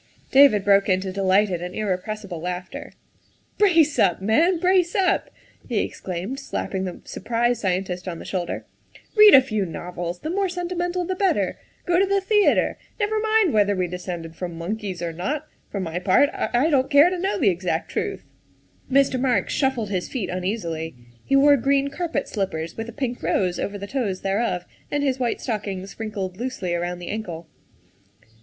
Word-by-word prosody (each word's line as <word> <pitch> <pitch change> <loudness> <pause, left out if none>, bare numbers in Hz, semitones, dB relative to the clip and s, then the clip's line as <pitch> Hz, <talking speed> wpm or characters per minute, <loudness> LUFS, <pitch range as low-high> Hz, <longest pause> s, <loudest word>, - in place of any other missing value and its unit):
David 270 -8 +6
broke 200 0 +4
into 185 0 +1
delighted 190 -1 +2
and 180 +1 -6
irrepressible 200 -2 -3
laughter. 180 +1 -5 0.2
' - - -37
' - - -40
Brace 335 -7 +4
up, 175 - +3
man, 310 - +3
brace 365 0 +2
up! 385 -3 +2 0.2
" - - -26
he 235 - -1
exclaimed, 190 +9 -5
slapping 190 -7 -3
the 180 - -6
surprised 240 +3 -1
scientist 185 -1 -2
on 170 -2 -4
the - - -10
shoulder. 180 -3 -3 0.3
" - - -23
Read 425 -4 +9
a 265 - +9
few 215 -6 -1
novels, 175 0 -5
the 315 - -3
more 390 +1 0
sentimental 355 0 -2
the 375 - -1
better; 385 +1 0 0.3
go 355 -1 +3
to 390 - +3
the 395 0 +2
theatre; 410 +1 +2 0.2
never 430 +1 +1
mind 435 -5 +2
whether 205 -1 +3
we 185 -1 0
descended 175 -2 -6
from 175 -1 -6
monkeys 185 0 -4
or 170 -1 -3
not; 280 - -3 0.2
for 200 - -4
my 175 -2 -3
part, 185 +10 +4
I 245 +6 +1
don't 265 -2 +2
care 295 +4 +6
to 365 - -2
know 385 +3 0
the 225 - +3
exact 175 -2 -2
truth. - - -3 0.3
' - - -36
' - - -25
Mr. 270 -1 +3
Marks 245 -8 +1
shuffled 255 -7 0
his 185 -2 -2
feet 240 -8 -3
uneasily; 180 - -3 0.3
he 275 - +1
wore 285 +1 +6
green 275 +2 +1
carpet 325 -2 -2
slippers 170 -6 -3
with 225 +1 -5
a - - -6
pink 245 -1 -4
rose 180 -2 0
over 205 0 -3
the 200 - -6
toes 205 -5 -2
thereof, 195 -2 -1 0.2
and 290 0 -1
his 265 -2 0
white 240 -2 -1
stockings 200 -4 -4
wrinkled 200 -4 -4
loosely 235 -7 -3
around 175 +1 -2
the 175 0 -8
ankle. 175 -6 -5
215 Hz, 185 wpm, -23 LUFS, 180-285 Hz, 0.3 s, Read